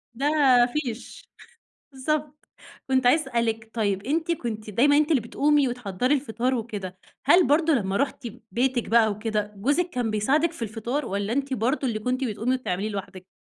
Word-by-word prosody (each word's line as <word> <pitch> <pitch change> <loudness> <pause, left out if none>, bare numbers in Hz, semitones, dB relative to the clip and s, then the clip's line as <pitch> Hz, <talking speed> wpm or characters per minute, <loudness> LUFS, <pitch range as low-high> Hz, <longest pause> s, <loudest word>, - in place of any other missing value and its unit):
ده 275 +4 0 0.5
فيش 250 -6 -5 0.6
بالضبط، 300 +2 -3 0.4
كنت 260 -1 +2
عايزة 305 +5 +5
أسألِك 225 -2 -1
طيّب 200 -4 0
أنت 325 +4 0
كنتِ 220 -7 -5
دايمًا 285 +7 +4
أنتِ 305 +2 +2
اللي 275 -6 +4
بتقومي 285 +4 +2
وتحضّري 245 +2 -1
الفطار 255 -1 -1
وكده، 205 -6 -5 0.3
هل 345 +6 +5
برضه 315 +2 +3
لمّا 200 -7 0
رُحتِ 275 -2 -2 0.3
بيتِك 245 0 0
بقى 225 -2 +4
وكده، 210 0 -2
جوزِك 290 - 0
كان 245 -5 -2
بيساعدِك 290 +11 +1
في 240 - -10
الفطار؟ 235 +6 -3
والَّا 200 +3 -2
أنتِ 275 0 -1
برضه 255 +4 0
اللي 215 -2 -2
كنتِ 255 +4 -2
بتقومي 230 +3 -1
وتعمليه 210 -5 -2
لوحدِك؟ 190 -2 -7
245 Hz, 160 wpm, -25 LUFS, 215-285 Hz, 0.6 s, عايزة